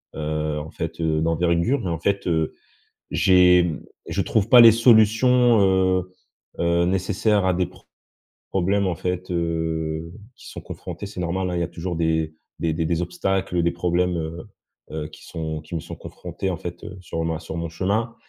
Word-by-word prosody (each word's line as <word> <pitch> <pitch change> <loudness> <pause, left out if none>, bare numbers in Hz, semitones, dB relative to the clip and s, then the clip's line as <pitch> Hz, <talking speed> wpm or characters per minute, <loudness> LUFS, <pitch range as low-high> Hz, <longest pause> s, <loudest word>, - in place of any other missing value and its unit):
heu, 75 0 -2
en 80 +1 -8
fait, - - -5
heu, 80 -1 +1
d'envergure. 85 - +1
Mais, 90 - -3
en 80 - -3
fait, 100 +3 -1
heu, 80 -2 0 0.6
j'ai 90 -1 +5 0.4
je 85 +4 -1
trouve 105 +2 0
pas 125 +1 +9
les 115 -1 +10
solutions, 115 +1 +5
heu 95 -1 +2 0.5
heu, 85 0 +2
nécessaires 95 +2 +1
à 95 - +3
des 90 +1 +1
pr 90 +1 -16 0.6
problèmes, 95 +1 +1
en 90 - -1
fait, 90 +2 -3
heu, 80 -1 -2 0.2
qui - - -14
sont - - -8
confrontés, - - -8
c'est 100 -2 -8
normal, 90 +1 -1
hein. - - -2
Il - - 0
y - - 0
a - - -2
toujours 85 +1 -5
des 80 -1 0 0.3
des 80 -1 0
des 80 +1 -1
des 85 +1 0
obstacles, 95 +1 -2
heu, - - +3
des 85 - +2
problèmes, 90 +1 0
heu 80 0 -5 0.4
heu, 75 -1 -4
qui - - -15
sont 80 -1 -5
qui 80 +2 -8
me - - -1
sont 85 - -8
confrontés, 90 +2 -6
en 90 - -2
fait, 85 -1 -8
heu, 95 - -8
sur 80 -2 -4
ma 80 -1 -2
sur 80 -1 -7
mon 85 0 -3
chemin. 100 +7 -1
85 Hz, 195 wpm, -23 LUFS, 80-95 Hz, 0.6 s, les